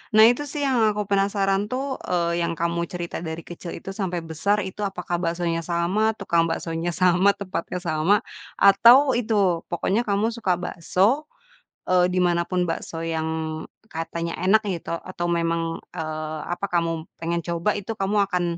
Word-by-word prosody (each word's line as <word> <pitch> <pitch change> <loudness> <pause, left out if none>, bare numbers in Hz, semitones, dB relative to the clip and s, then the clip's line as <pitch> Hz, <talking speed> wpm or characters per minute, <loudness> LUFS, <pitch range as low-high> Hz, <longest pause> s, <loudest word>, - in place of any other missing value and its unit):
Nah 220 - +9
itu 290 +4 -4
sih 290 +1 -3
yang 260 -3 +2 0.2
aku 210 - -1
penasaran 195 0 +2
tuh, 265 +2 -3
eee, 170 -1 0
yang 170 0 -1
kamu 170 +1 -1
cerita 175 -1 -5
dari 160 -1 -5
kecil 175 0 -8
itu 190 - -7
sampai 180 -4 -3
besar 195 +6 0
itu 190 +2 -8
apakah 180 -2 -3
baksonya 170 -1 -1
sama, 180 +6 0
tukang 170 -4 +1
baksonya 165 +1 -3
sama, 185 +2 +4
tempatnya 180 -2 -4
sama 160 +4 +2 0.4
atau 235 +8 +7
itu 235 -3 0 0.3
pokoknya 205 +6 0
kamu 205 +3 +1
suka 215 -6 0
bakso, 190 - 0 0.6
eee, 180 -1 +5
di 185 - +2
mana 170 -1 +2
pun 180 -2 -1
bakso 165 0 -4
yang 160 -1 -2 0.6
katanya 165 0 -4
enak 215 +3 +5
gitu 170 -2 -3
atau 175 +1 -4
memang, 165 -1 -1
eee, 155 -2 -4
apa 200 +3 -3
kamu 165 -2 -1
pengen 170 +1 -2
coba 170 +4 -1
itu 210 +2 -5
kamu 200 +1 +1
akan 180 -2 0
180 Hz, 160 wpm, -24 LUFS, 170-200 Hz, 0.6 s, Nah